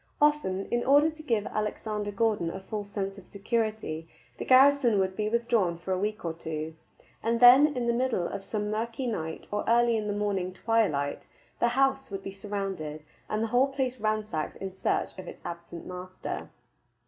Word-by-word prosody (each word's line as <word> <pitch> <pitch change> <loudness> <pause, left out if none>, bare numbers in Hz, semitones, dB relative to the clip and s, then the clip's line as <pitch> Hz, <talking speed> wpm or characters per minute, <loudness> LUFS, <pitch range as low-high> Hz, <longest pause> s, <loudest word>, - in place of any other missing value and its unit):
Often, 295 -11 +2
in 240 0 +1
order 290 +4 +5
to 310 0 -12
give 230 -8 0
Alexander 210 0 -2
Gordon 205 -4 +1
a 190 - -5
false 205 +1 -5
sense 195 -1 -3
of 185 - -17
security, 215 -6 -2 0.3
the - - -3
garrison 265 -3 +6
would 190 -1 +1
be 210 +1 -1
withdrawn 230 -7 +1
for 175 +2 -6
a 185 - 0
week 210 0 -2
or 165 - -1
two, 160 -1 -5 0.5
and 230 +1 +1
then 260 +4 +8
in 245 - 0
the 235 - +2
middle 235 -8 0
of 195 - -5
some 210 +1 -3
mirky 230 +4 -2
night 160 -9 -3
or 205 0 -1
early 235 0 +4
in 215 -1 -1
the 205 - 0
morning 195 -3 -1
twilight 185 -10 0 0.3
the 235 - +4
house 270 +2 +2
would 195 -1 -5
be 195 - -5
surrounded 195 -7 -4 0.3
and 215 +1 0
the - - 0
whole 255 +3 +5
place 265 -2 -2
ransacked 215 -7 -1
in 195 -1 -5
search 190 - 0
of 185 - -8
its - - -10
absent 170 0 -7
master. 185 0 -6
210 Hz, 185 wpm, -28 LUFS, 190-235 Hz, 0.5 s, then